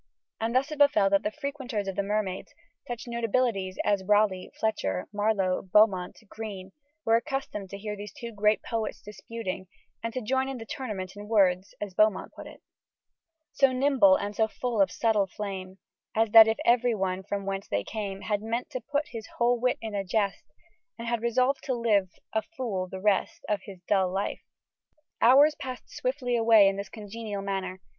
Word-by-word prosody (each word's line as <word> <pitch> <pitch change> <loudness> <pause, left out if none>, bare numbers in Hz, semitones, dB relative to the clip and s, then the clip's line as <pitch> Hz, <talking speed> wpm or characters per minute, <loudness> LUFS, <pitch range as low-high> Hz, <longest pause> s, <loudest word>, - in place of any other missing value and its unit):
And 230 +2 -1
thus 275 +4 +2
it 305 - -5
befell 215 -9 +5
that 200 - +4
the - - -1
frequenters 265 -6 -4
of 195 - -3
the - - +1
Mermaid 200 -2 -2 0.4
such 240 -2 -5
notabilities 230 -5 0
as 200 -2 +2
Raleigh, 205 -2 +2
Fletcher, 95 - -1
Marlowe, 205 -3 +1
Beaumont, 190 -2 +3
Greene, 195 -3 -7 0.3
were 225 0 +5
accustomed 235 -6 -4
to 200 - -7
hear 210 +1 -5
these 205 -1 -8
two 235 +3 -8
great 210 0 +2
poets 225 -2 -3
disputing, 210 -2 -6 0.3
and 230 - -3
to 255 - -3
join 265 +3 0
the 225 - -8
tournament, 210 -9 -5
in 205 0 -9
words 190 -3 +2
(as 205 -2 -5
Beaumont 215 0 +2
put - - -10
it) - - -14 0.9
So 275 -1 +4
nimble 255 -7 +5
and 205 +1 -3
so 220 0 +2
full 230 -1 -1
of 195 - +4
subtle 215 -4 +1
flame, 190 -1 -6 0.4
As 225 0 +3
if - - -20
that 220 0 +9
everyone 225 -6 +2
from 200 0 -4
whence 195 0 -3
they 100 0 -1
came 200 - -5
Had 205 -1 -1
meant 230 +3 -3
to 255 - -4
put 285 +5 -2
his 225 -2 -7
whole 240 0 +3
wit 250 +1 +1
in 220 -2 -5
a 200 -1 -1
jest, 200 +1 -1 0.5
And 230 0 -6
had 235 -1 0
resolved 255 +3 +1
to 260 - 0
live 210 -5 +2 0.2
a 220 - +2
fool 225 - -4
the 190 - -6
rest 205 0 0
Of 210 -2 0
his 190 -3 -11
dull 190 -3 +2
life. 195 +2 -2 0.8
Hours 280 +6 +7
passed 255 -3 -8
swiftly 255 -1 -1
away 225 -3 +6
in 195 - +1
this 200 - -5
congenial 210 -1 -6
manner. 190 -1 -3
215 Hz, 180 wpm, -28 LUFS, 195-235 Hz, 0.9 s, that